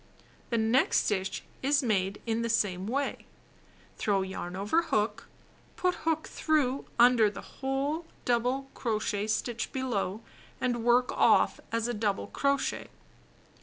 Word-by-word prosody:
The 235 - +1
next 225 +4 +3
stitch 190 -2 -1 0.2
is 280 +1 +2
made 195 -4 0
in 230 0 0
the 230 - -1
same 195 -4 0
way: 275 +4 -2 0.7
throw 200 -2 +1
yarn 185 -1 -5
over 205 - +2
hook; 230 -10 -1 0.5
put 365 0 +1
hook 320 -2 -1
through 280 -4 0
under 235 -3 +6
the 205 - -11
whole 280 +5 -1 0.2
double 250 +3 0
crochet 215 -3 -1
stitch 225 +1 -2
below 225 -6 -2 0.4
and 240 -2 -1
work 245 +1 +4
off - - +4
as 230 0 0
a 240 - -1
double 210 -3 -1
crochet. 280 -1 -1
235 Hz, 130 wpm, -29 LUFS, 210-270 Hz, 0.7 s, under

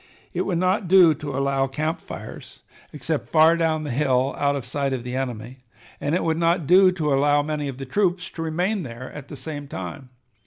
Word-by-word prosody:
It - - -1
would 180 -4 0
not 185 +2 +1
do 180 -3 +7
to 145 -2 -5
allow 135 0 +1
camp 155 +4 -3
fires - - -10 0.3
except 150 +1 -3
far 160 +1 +5
down 160 -2 0
the 150 - -4
hill 130 0 +1
out 140 0 +1
of 135 -4 -4
sight 135 +1 -1
of 125 -2 -3
the 125 +1 -5
enemy, 125 -1 -4 0.4
and 145 +3 -1
it - - 0
would 160 -1 0
not 170 -1 +2
do 185 +4 +6
to 155 -5 0
allow 145 +1 +3
many 150 -1 -3
of 135 -2 -6
the 135 - -6
troops 180 +4 0
to 165 - -7
remain 180 +6 -1
there 125 -3 -8
at 145 -2 -9
the - - -8
same 145 +1 -6
time. 95 +3 -7
145 Hz, 210 wpm, -23 LUFS, 135-165 Hz, 0.4 s, do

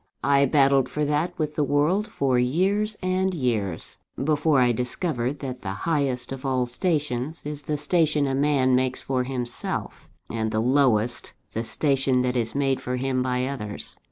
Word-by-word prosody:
I 140 0 +4
battled 135 -1 +3
for 150 0 -1
that 150 +5 -1
with 155 -1 -2
the 150 - +1
world 155 +9 +1
for 130 -3 +1
years 195 +11 +1
and 185 0 0
years, 110 - -2 0.2
before 150 -1 +2
I 125 -1 +4
discovered 125 +2 -2
that 130 -3 -5
the 95 -2 -4
highest 140 -7 0
of 135 -1 -6
all 130 -2 +1
stations 150 +1 -1
is 150 0 -4
the 150 0 -2
station 150 -1 +2
a 135 - -1
man 135 -2 +3
makes 130 0 0
for 130 -1 0
himself: 125 -2 -4 0.2
and 110 -1 -2
the 110 - -1
lowest, 120 -2 +2 0.2
the 115 - -2
station 135 0 +1
that 125 0 0
is 115 -1 -1
made 135 -2 +1
for 125 - -3
him 130 0 0
by 125 0 0
others. 115 -7 -5
135 Hz, 170 wpm, -25 LUFS, 125-150 Hz, 0.2 s, I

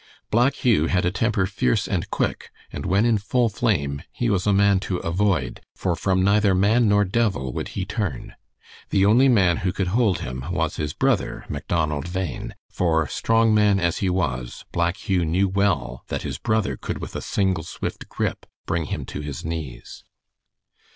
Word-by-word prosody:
Black 120 +5 +3
Hugh 105 -11 +2
had 90 -2 +1
a 90 - +2
temper 100 0 +1
fierce 80 -10 0
and - - -2
quick, - - -2 0.2
and - - -4
when 100 +5 +3
in 115 -3 +3
full 115 +3 +1
flame 75 - 0
he 120 -2 -1
was 95 0 0
a - - +5
man 100 -1 +4
to 95 -1 -3
avoid, 85 -6 0
for 90 -3 -1
from 95 +2 +1
neither 100 0 +3
man 105 +4 +3
nor 105 0 +4
devil 95 - 0
would - - -3
he 95 - -1
turn. 100 -5 -4 0.6
The 95 0 +3
only 120 +6 +5
man 95 -8 +4
who 90 - -1
could 95 -1 -2
hold 105 -2 +2
him 65 +1 -5
was - - -1
his 75 -1 -2
brother 115 -4 0
Macdonald 75 +1 -2
Bhain, 95 -3 -4
for 80 -3 +1
strong 115 -1 +2
man 105 -2 +4
as 85 -2 0
he 95 - +1
was, 65 -10 -2
Black 85 +1 0
Hugh 95 -3 0
knew 90 +5 +2
well 95 -10 0
that - - -3
his - - -4
brother 110 -2 0
could - - -4
with - - -7
a - - -3
single 95 -5 0
swift - - -6
grip - - -3 0.2
bring 85 -3 -1
him - - -4
to - - -6
his 75 -2 -6
knees. 80 -6 -6
95 Hz, 185 wpm, -23 LUFS, 85-105 Hz, 0.6 s, a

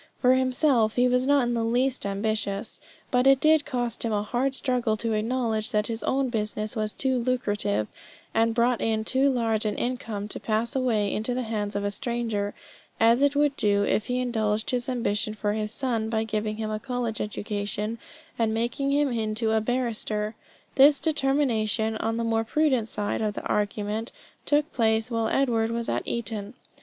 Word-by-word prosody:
For 255 0 +5
himself 255 -3 +2
he 250 0 +4
was 250 +1 +1
not 285 -2 +4
in 240 0 0
the 230 -1 0
least 245 0 0
ambitious, 205 +1 -2 0.3
but 250 0 +3
it 270 -1 +6
did 310 0 +4
cost 245 -4 -2
him 230 - -1
a 205 -1 0
hard 255 +5 0
struggle 245 -5 +1
to 225 +1 -1
acknowledge 225 0 -1
that 210 -3 +1
his 225 0 -3
own 270 -1 0
business 215 -1 -2
was 215 -1 -1
too 260 +1 0
lucrative, 205 - 0 0.5
and 225 0 +2
brought 240 0 +2
in 220 -1 0
too 270 +3 +3
large 225 -4 0
an 210 -1 -1
income, 225 -5 -3
to - - -4
pass 225 +2 -1
away 225 -6 +1
into 225 +3 -1
the 255 - -1
hands 210 -2 -3
of 200 - -1
a 205 - -1
stranger, 225 -3 -2 0.4
as 230 +3 +5
it 285 0 +3
would 290 -1 +2
do 205 -3 +2
if 210 - 0
he 250 0 0
indulged 220 -3 0
his 250 0 -1
ambition 215 -4 -1
for 210 -1 -1
his 215 0 -2
son 230 -3 -1
by 220 -1 0
giving 215 -1 -2
him 215 -1 -3
a 215 - -2
college 245 -2 -3
education 210 +1 -3 0.4
and 220 -1 +1
making 240 +5 -1
him 290 0 +2
into 220 -1 -1
a 220 0 +2
barrister. 220 -3 -2 0.4
This 280 +1 +6
determination 265 -8 +1
on 225 +1 -1
the 230 - -1
more 225 -1 +1
prudent 260 -2 +1
side 205 +1 -2
of 210 -1 -1
the - - -5
argument 210 +2 -1 0.4
took 295 +1 +2
place 225 0 +1
while 230 -1 0
Edward 230 -3 +1
was 230 0 -3
at - - 0
Eton. 220 -1 -3
225 Hz, 185 wpm, -26 LUFS, 215-250 Hz, 0.5 s, it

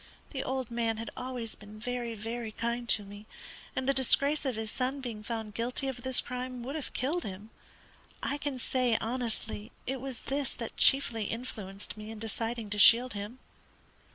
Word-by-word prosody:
The 270 -2 -2
old 260 -2 -2
man 230 -1 +1
had 225 +1 -5
always 250 -3 -4
been 210 0 -12
very, 240 0 -2
very 225 +1 -4
kind 235 +2 -2
to 210 - +5
me, 205 +1 -11 0.5
and 260 - -1
the 275 - +5
disgrace 280 +3 +4
of 260 -3 0
his 220 0 -3
son 260 +2 -1
being 235 -5 -5
found 220 -1 -4
guilty 245 +5 -1
of 255 -2 -3
this 260 +1 +6
crime 250 -1 -4
would 265 +3 -4
have 310 -3 -4
killed 315 +7 0
him. 205 +3 -7 0.7
I 285 - 0
can 285 -2 -2
say, 250 -2 +2
honestly, 225 -2 -2
it 265 0 -2
was 265 -3 -2
this 275 -1 -1
that 230 -2 -6
chiefly 235 -5 +5
influenced 210 -4 -3
me 215 0 -7
in 225 - -6
deciding 225 0 -3
to 205 - 0
shield 240 +5 +8
him. 205 +4 -5
235 Hz, 180 wpm, -31 LUFS, 220-260 Hz, 0.7 s, shield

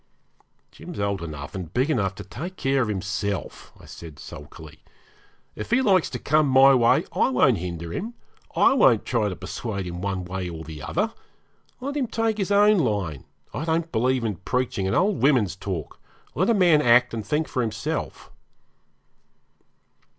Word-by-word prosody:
'Jim's - - -9
old 100 -2 -1
enough 75 -4 -7
and 90 -4 -7
big 130 +3 +2
enough 100 - 0
to 100 - -8
take 140 - -7
care 135 -4 +1
of 120 - 0
himself,' 100 -1 -4
I - - -15
said 80 -4 -11
sulkily. 75 +1 -11 0.8
'If - - -6
he 245 +3 +3
likes 190 -7 +3
to - - -4
come 155 0 +2
my 135 +1 +7
way 120 -3 +4
I - - +2
won't 125 -4 +3
hinder 85 -1 -5
him; 230 +4 -5 0.4
I - - +5
won't 125 - +4
try 110 -4 0
to 95 - -5
persuade 100 -2 -5
him 90 0 -6
one 95 -2 -3
way 90 0 -4
or 80 -1 -7
the 80 -2 -9
other. 205 - -1 0.7
Let 280 +3 -4
him 275 -4 0
take 225 -1 -1
his 195 - -1
own 205 0 +5
line; 100 - -1 0.3
I - - -3
don't 165 0 -1
believe 125 +2 +1
in 105 -5 -2
preaching 110 -1 -2
and 95 - 0
old 200 0 +1
women's 125 - +3
talk. 95 -6 -6 0.3
Let 185 +6 +1
a 230 - +4
man 175 -6 +5
act 125 -1 +4
and 110 -2 -3
think 150 +9 -1
for 130 - -2
himself.' 110 -2 -4
115 Hz, 175 wpm, -24 LUFS, 95-155 Hz, 0.8 s, my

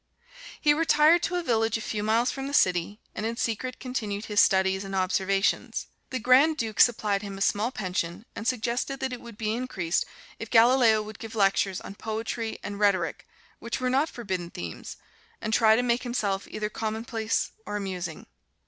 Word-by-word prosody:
He 295 - +4
retired 315 +1 +4
to 360 - -1
a 355 - -1
village 225 -5 +1
a - - -7
few 210 -1 -3
miles 225 +4 +2
from 270 0 -5
the 285 - -2
city, 180 - +2
and - - -5
in 230 +1 -2
secret 245 +3 -2
continued 220 -5 -4
his 210 -1 +1
studies 190 0 +3
and 195 0 -5
observations. 190 +1 0 0.2
The 260 - -2
Grand 260 +6 +5
Duke 220 -6 -3
supplied 210 -4 +4
him 200 -2 -7
a - - -8
small 210 +3 +2
pension 185 -3 -3
and 225 - -5
suggested 250 +2 -1
that 265 -1 -2
it 245 - -7
would 235 -3 -11
be 215 -1 -1
increased 215 -9 -1 0.3
if - - -6
Galileo 230 -2 +5
would 215 -1 -10
give 225 0 -8
lectures 195 -2 +2
on - - -8
Poetry 220 +1 -4
and 205 0 -5
Rhetoric, 185 -4 +1 0.3
which 235 +2 -4
were 255 0 0
not 280 +5 +2
forbidden 185 -7 -4
themes, 85 - -7 0.4
and 215 - -3
try 220 -1 +5
to 245 - +1
make 240 0 +1
himself 205 -6 -2
either 215 0 -3
commonplace 225 0 -2 0.2
or 205 - -3
amusing. 180 -5 -4
220 Hz, 185 wpm, -27 LUFS, 195-245 Hz, 0.4 s, Grand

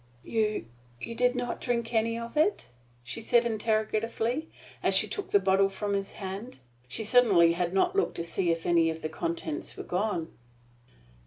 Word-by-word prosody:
"You 215 - 0 0.3
you 230 - -5
did 245 +2 +2
not 245 -1 -3
drink 235 -1 -1
any 230 0 +1
of 235 +3 -7
it?" 315 - +1 0.3
she 125 - -5
said 235 +1 +3
interrogatively, 225 +5 -1 0.3
as - - +2
she - - +4
took 405 - -5
the - - +5
bottle 195 +1 +3
from 200 +1 -3
his 195 -1 -2
hand. 200 +5 -6 0.3
She 175 - -3
certainly 210 -7 +5
had 175 0 -1
not 270 - +2
looked 395 - +1
to 170 - -2
see 170 +1 -1
if 165 0 0
any 170 -1 +4
of 160 0 -5
the 155 - -2
contents 160 -1 -4
were - - -5
gone. 180 -3 -1
215 Hz, 175 wpm, -28 LUFS, 175-235 Hz, 0.3 s, the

